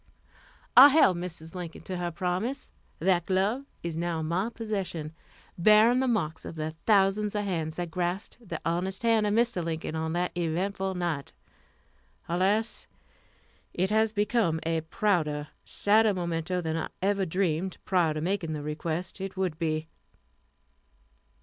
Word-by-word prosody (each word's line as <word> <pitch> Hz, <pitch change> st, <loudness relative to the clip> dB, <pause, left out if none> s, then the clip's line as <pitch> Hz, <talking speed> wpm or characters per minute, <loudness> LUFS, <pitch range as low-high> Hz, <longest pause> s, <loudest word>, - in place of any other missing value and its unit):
I 260 Hz, +3 st, +12 dB
held 275 Hz, -, +5 dB
Mrs. 165 Hz, -2 st, -7 dB
Lincoln 175 Hz, -3 st, -7 dB
to 185 Hz, -, -4 dB
her 175 Hz, 0 st, -2 dB
promise. 185 Hz, -, -3 dB, 0.3 s
That 175 Hz, 0 st, +1 dB
glove 200 Hz, +8 st, +1 dB, 0.2 s
is 170 Hz, -2 st, -3 dB
now 170 Hz, -1 st, -1 dB
in -, -, -3 dB
my 180 Hz, +7 st, 0 dB
possession, 195 Hz, -9 st, -4 dB, 0.5 s
bearing 215 Hz, +6 st, +6 dB
the 265 Hz, -, +1 dB
marks 165 Hz, -10 st, -1 dB
of -, -, -7 dB
the 155 Hz, 0 st, -3 dB
thousands 205 Hz, 0 st, +3 dB
of 205 Hz, 0 st, 0 dB
hands 160 Hz, -5 st, -2 dB
that 175 Hz, -1 st, -4 dB
grasped 180 Hz, +6 st, -3 dB
the 165 Hz, -, -3 dB
honest 180 Hz, +5 st, -1 dB
hand 225 Hz, -2 st, +3 dB
of 205 Hz, -, +1 dB
Mr. 235 Hz, -6 st, +1 dB
Lincoln 160 Hz, -1 st, -3 dB
on 160 Hz, 0 st, -2 dB
that 180 Hz, +1 st, 0 dB
eventful 190 Hz, +3 st, -1 dB
night. 170 Hz, -6 st, -3 dB, 0.9 s
Alas! 200 Hz, +6 st, 0 dB, 0.9 s
it 190 Hz, +3 st, 0 dB
has 220 Hz, 0 st, +3 dB
become 210 Hz, -5 st, +1 dB
a 165 Hz, 0 st, 0 dB
prouder, 155 Hz, -4 st, 0 dB
sadder 215 Hz, 0 st, +3 dB
memento 170 Hz, 0 st, -2 dB
than 160 Hz, -1 st, -2 dB
I 160 Hz, -, -2 dB, 0.2 s
ever 195 Hz, -1 st, +1 dB
dreamed 180 Hz, +1 st, -1 dB
prior 170 Hz, -5 st, +2 dB
to 155 Hz, -, -2 dB
making 175 Hz, -2 st, -1 dB
the 150 Hz, -1 st, -4 dB
request 165 Hz, +5 st, -4 dB
it 195 Hz, 0 st, -5 dB
would 180 Hz, -4 st, -1 dB
be. 155 Hz, -1 st, -1 dB
180 Hz, 150 wpm, -28 LUFS, 165-205 Hz, 0.9 s, I